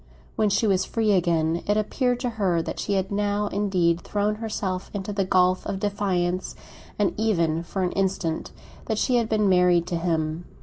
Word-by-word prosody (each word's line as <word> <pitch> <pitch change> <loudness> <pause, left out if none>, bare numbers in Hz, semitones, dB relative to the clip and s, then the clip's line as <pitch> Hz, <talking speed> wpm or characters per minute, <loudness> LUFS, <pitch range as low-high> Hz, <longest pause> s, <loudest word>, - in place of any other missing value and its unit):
When 215 - +2
she 200 +3 +1
was 190 -3 +2
free 220 0 0
again 170 -3 +1
it 205 +1 +2
appeared 245 +3 0
to 245 -2 -1
her 175 -4 +2
that - - -5
she 205 - -1
had 190 0 -1
now 205 0 0
indeed 180 -4 +1
thrown 210 +1 -1
herself 205 -4 -3
into 205 +1 -3
the 195 -1 0
gulf 185 0 +3
of 195 - -3
defiance, 185 -3 -1 0.4
and 205 -2 +1
even, 170 -7 +1
for 185 +3 -3
an 180 - 0
instant, 190 -4 -1 0.4
that 220 - -1
she 250 +2 +2
had 230 -2 0
been 215 -2 +2
married 180 -2 +4
to 175 - -2
him. 165 -1 -1
190 Hz, 185 wpm, -25 LUFS, 175-210 Hz, 0.4 s, married